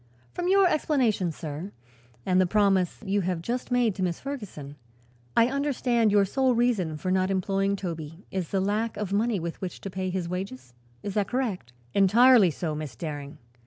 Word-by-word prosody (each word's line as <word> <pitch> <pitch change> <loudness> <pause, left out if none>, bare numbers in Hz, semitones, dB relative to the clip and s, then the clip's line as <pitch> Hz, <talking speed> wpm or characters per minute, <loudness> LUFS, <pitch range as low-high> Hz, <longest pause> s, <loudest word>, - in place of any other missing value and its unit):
From 355 - -2
your 390 +1 +5
explanation, 255 - +1
sir, 160 +4 -7 0.5
and 185 0 +3
the 185 - +2
promise 195 -1 +2
you 200 +1 +1
have 180 -2 -1
just 240 +9 -3
made 245 -4 +2
to 190 - -6
Miss 175 -2 -1
Ferguson, 205 - -7 0.6
I 230 - +7
understand 250 -4 +1
your 200 -1 +4
sole 260 +4 +1
reason 215 -10 +1
for 185 +4 -2
not 185 0 +2
employing 195 +1 0
Toby 165 -2 -6
is 185 -3 -3
the 195 - 0
lack 210 +3 -1
of 205 -2 -3
money 215 0 +1
with 170 0 -5
which 185 -2 -5
to 195 - -6
pay 185 0 -3
his 180 -2 -2
wages. 150 -9 -6 0.3
Is 200 - -4
that 205 -1 0
correct?" 225 - -2 0.2
"Entirely 215 +2 +6
so, 160 0 -3
Miss 150 -5 -6
Daring. 145 +1 -6
195 Hz, 180 wpm, -27 LUFS, 175-230 Hz, 0.6 s, I